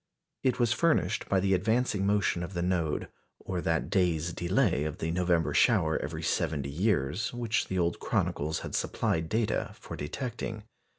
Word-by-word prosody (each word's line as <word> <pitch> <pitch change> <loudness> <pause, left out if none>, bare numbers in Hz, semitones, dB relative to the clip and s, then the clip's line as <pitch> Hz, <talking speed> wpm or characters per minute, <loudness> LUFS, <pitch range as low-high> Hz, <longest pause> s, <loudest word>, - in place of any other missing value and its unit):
It 130 -2 +1
was 120 -2 +3
furnished 115 - +1
by 95 - +3
the 95 +1 +2
advancing 105 +1 +1
motion 100 -4 +2
of 90 +2 -6
the 85 - 0
node, 85 -4 0 0.3
or 90 -2 -4
that 80 -1 0
day's 85 -3 +1
delay 90 - +1
of 75 -1 -3
the 80 - -2
November 85 -1 +1
shower 80 0 +3
every 80 +2 -5
seventy 75 -5 -1
years, 90 0 0
which 115 -2 0
the 95 - -2
old 85 -1 +1
chronicles 80 +2 -1
had - - -7
supplied 80 0 0
data 110 0 0
for - - -8
detecting. 110 - -4
90 Hz, 165 wpm, -29 LUFS, 80-105 Hz, 0.3 s, was